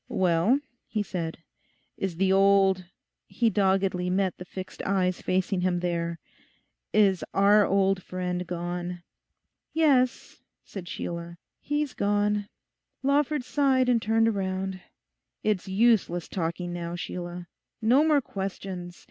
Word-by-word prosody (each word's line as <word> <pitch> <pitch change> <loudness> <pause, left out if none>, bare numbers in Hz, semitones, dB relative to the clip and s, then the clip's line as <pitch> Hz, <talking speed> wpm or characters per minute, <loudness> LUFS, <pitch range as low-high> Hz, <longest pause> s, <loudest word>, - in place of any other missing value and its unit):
'Well,' 185 +8 +3 0.3
he 210 -2 -1
said, 170 -4 -4 0.6
'is 190 -3 -3
the 190 +2 +2
old—' 195 -1 +4 0.4
he 230 -2 +1
doggedly 190 -2 +1
met 190 0 +1
the 180 - -7
fixed 185 +1 -8
eyes 185 -2 0
facing 185 0 0
him 180 -1 +1
there, 170 -1 -2 0.7
'is 195 -5 +3
our 205 +1 +5
old 195 -1 +2
friend 180 -1 -3
gone?' 175 0 -4 0.7
'Yes,' 270 -6 +2 0.2
said 185 -4 -8
Sheila, 170 0 -5 0.2
'he's 295 -2 -2
gone.' 205 0 0 0.5
Lawford 285 0 +2
sighed 260 -1 +2
and 235 -2 +3
turned 225 +1 +2
round. 190 -1 -3 0.6
'It's 210 -4 0
useless 190 -4 +2
talking 175 0 -3
now, 170 0 -4
Sheila. 175 0 -6 0.3
No 245 +6 +4
more 305 -2 +4
questions. 190 -4 -6
190 Hz, 120 wpm, -27 LUFS, 180-215 Hz, 0.7 s, our